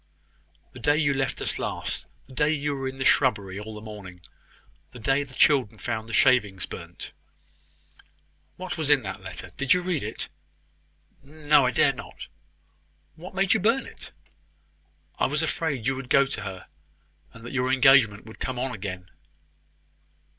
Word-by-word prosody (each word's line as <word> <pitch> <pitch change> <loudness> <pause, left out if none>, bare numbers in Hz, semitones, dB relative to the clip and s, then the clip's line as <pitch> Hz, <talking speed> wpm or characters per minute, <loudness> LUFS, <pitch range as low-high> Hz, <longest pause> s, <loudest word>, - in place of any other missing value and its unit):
"The 125 - -11
day 145 +5 +3
you 150 -3 +2
left 135 0 -1
us - - -1
last - - -3 0.2
the 130 - -15
day 150 +3 +2
you 145 -2 0
were 135 -1 -3
in 130 0 -6
the 130 - -2
shrubbery 100 -8 +2
all 110 +1 -7
the 105 - -8
morning 100 -5 -10 0.7
the 125 - -10
day 135 +5 +2
the 135 -3 -8
children 130 -7 +3
found 110 0 -4
the - - -6
shavings 105 -9 +3
burnt." 85 0 -9 1.4
"What 185 -2 -6
was 155 -2 0
in 145 -4 +5
the 95 -1 -3
letter? - - -8
Did 140 +5 +4
you 180 - 0
read 175 -5 -1
it?" 110 +2 -4 0.9
"No; 145 -1 +3
I - - +3
dared - - +3
not." - - -9 0.9
"What 180 +4 -11
made 195 0 +3
you 220 - +2
burn 230 +7 +2
it?" - - -11 1.1
"I - - +3
was 150 +4 0
afraid 150 -6 -1
you 135 +1 +1
would 130 -1 -7
go 140 -1 +5
to 135 - -4
her, 95 -2 -7 0.7
and 115 0 -13
that 120 - -7
your 130 -1 +1
engagement 130 -6 +5
would 110 - -12
come 130 -1 -3
on 130 +1 -2
again." 95 -3 -6
130 Hz, 170 wpm, -26 LUFS, 110-145 Hz, 1.4 s, in